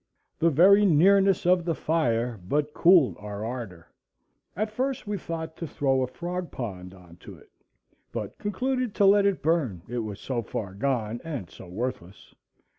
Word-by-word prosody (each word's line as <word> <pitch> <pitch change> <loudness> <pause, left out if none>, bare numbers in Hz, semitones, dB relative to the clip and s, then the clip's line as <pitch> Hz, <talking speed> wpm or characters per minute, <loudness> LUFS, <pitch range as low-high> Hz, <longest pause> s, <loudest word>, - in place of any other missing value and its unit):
The 165 - +4
very 190 +7 +6
nearness 195 +2 +4
of 180 0 +4
the 165 -1 -1
fire 120 -9 0
but 150 +5 0
cooled 170 -6 +5
our 105 0 -6
ardor. 115 -9 -6 0.7
At 215 +4 -2
first 260 +4 -2
we 205 0 -2
thought 160 -3 -5
to 165 - -5
throw 135 -2 0
a 130 - 0
frog 175 +6 -5
pond 95 -6 -7
on 90 -2 -16
to - - -12
it; - - -21 0.6
but - - -6
concluded 250 +2 -2
to 200 - +3
let 200 +1 +5
it 195 -3 -1
burn, 140 - 0
it 120 +1 -3
was 110 -3 -5
so 125 -3 -3
far 100 -4 -5
gone 115 0 -2
and 140 - -6
so - - -12
worthless. 100 -1 -6
145 Hz, 170 wpm, -26 LUFS, 110-185 Hz, 0.7 s, very